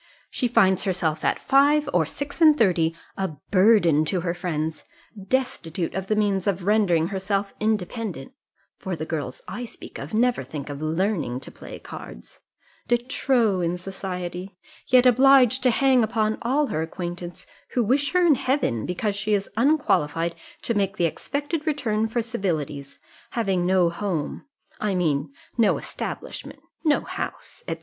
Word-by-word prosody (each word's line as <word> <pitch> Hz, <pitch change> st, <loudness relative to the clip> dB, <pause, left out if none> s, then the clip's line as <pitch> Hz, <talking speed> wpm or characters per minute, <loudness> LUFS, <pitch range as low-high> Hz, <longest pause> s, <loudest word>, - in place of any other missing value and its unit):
She 250 Hz, -, 0 dB
finds 190 Hz, -5 st, +3 dB
herself 175 Hz, -5 st, -1 dB
at -, -, +1 dB
five 285 Hz, +2 st, +4 dB
or 165 Hz, -4 st, +3 dB
six 285 Hz, -, -6 dB
and 310 Hz, -2 st, +7 dB
thirty 170 Hz, -, +2 dB, 0.2 s
a 190 Hz, -5 st, -2 dB, 0.2 s
burden 185 Hz, -6 st, +5 dB
to 180 Hz, +2 st, 0 dB
her 170 Hz, -1 st, -1 dB
friends, 160 Hz, -3 st, -3 dB, 0.4 s
destitute 185 Hz, -9 st, -1 dB
of 190 Hz, 0 st, -3 dB
the 215 Hz, -, +1 dB
means 200 Hz, -3 st, +1 dB
of 190 Hz, -2 st, 0 dB
rendering 180 Hz, -5 st, +3 dB
herself 195 Hz, 0 st, -2 dB
independent 210 Hz, -, -2 dB, 0.5 s
(for 190 Hz, -2 st, -3 dB
the 155 Hz, -1 st, -5 dB
girls 145 Hz, -6 st, -4 dB
I 245 Hz, +5 st, -5 dB
speak 230 Hz, -, -10 dB
of -, -, -7 dB
never 240 Hz, +3 st, +2 dB
think 140 Hz, +2 st, -7 dB
of 140 Hz, +1 st, -7 dB
learning 160 Hz, -, -1 dB
to -, -, -9 dB
play -, -, -10 dB
cards), -, -, -11 dB, 0.5 s
de 240 Hz, -, +4 dB
trop 235 Hz, -5 st, +1 dB
in 170 Hz, +1 st, 0 dB
society, 180 Hz, 0 st, -6 dB, 0.3 s
yet 255 Hz, 0 st, +5 dB
obliged 260 Hz, 0 st, +6 dB
to 255 Hz, -, +4 dB
hang 260 Hz, 0 st, +4 dB
upon 220 Hz, -1 st, 0 dB
all 275 Hz, +5 st, +2 dB
her 155 Hz, -, 0 dB
acquaintance, 175 Hz, +1 st, -6 dB, 0.3 s
who 245 Hz, -, +2 dB
wish 275 Hz, +7 st, +1 dB
her 360 Hz, -1 st, +4 dB
in 325 Hz, -, +6 dB
heaven, 255 Hz, -, 0 dB
because 200 Hz, +3 st, -1 dB
she 210 Hz, +1 st, +1 dB
is 200 Hz, -1 st, -3 dB
unqualified 170 Hz, -, +2 dB, 0.3 s
to 235 Hz, -, 0 dB
make 200 Hz, -1 st, 0 dB
the 175 Hz, -, +2 dB
expected 290 Hz, -, -3 dB
return 225 Hz, -8 st, 0 dB
for 230 Hz, +1 st, -1 dB
civilities, 155 Hz, -, -3 dB, 0.4 s
having 190 Hz, -6 st, 0 dB
no 180 Hz, -2 st, +3 dB
home, 175 Hz, -, -3 dB, 0.3 s
I 210 Hz, -3 st, 0 dB
mean 150 Hz, -5 st, 0 dB, 0.3 s
no 225 Hz, -, +4 dB
establishment, -, -, -6 dB, 0.2 s
no 305 Hz, -3 st, +3 dB
house, -, -, -6 dB
&c. -, -, -1 dB
195 Hz, 155 wpm, -24 LUFS, 170-240 Hz, 0.5 s, and